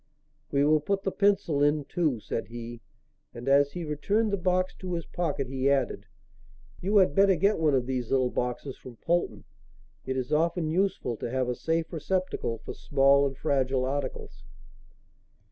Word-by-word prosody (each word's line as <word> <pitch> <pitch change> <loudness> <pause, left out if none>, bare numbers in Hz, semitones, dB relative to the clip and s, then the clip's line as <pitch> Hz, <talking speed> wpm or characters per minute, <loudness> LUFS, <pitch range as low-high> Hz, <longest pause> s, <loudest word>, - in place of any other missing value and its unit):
"We 140 0 +2
will 155 +1 +4
put 195 +6 -1
the 195 - -1
pencil 195 -8 +2
in 145 0 +2
too," 155 -6 0
said 115 - -4
he; 120 +1 -8 0.5
and, 120 +2 -8
as 140 +1 +4
he 175 -2 -4
returned 200 +9 0
the - - +5
box 185 0 0
to 180 -2 -4
his 170 - -4
pocket 155 -6 -2
he 135 +1 0
added: 135 -3 0 0.7
"you 200 +4 +2
had 185 -8 +5
better 195 +2 +5
get 195 +4 +2
one 155 -3 +3
of 125 -2 +1
these 125 -2 -3
little 130 -2 +2
boxes 125 +2 -3
from 125 -2 -12
Polton. 175 +8 -1 0.6
It 130 0 -1
is 130 +3 -2
often 165 +1 +1
useful 180 - 0
to - - -4
have 130 0 -1
a 125 - 0
safe 165 +5 -2
receptacle 175 -7 -2
for - - -5
small 140 0 +3
and 135 -1 -7
fragile 130 -2 0
articles." 135 0 -4
145 Hz, 175 wpm, -28 LUFS, 130-175 Hz, 0.7 s, the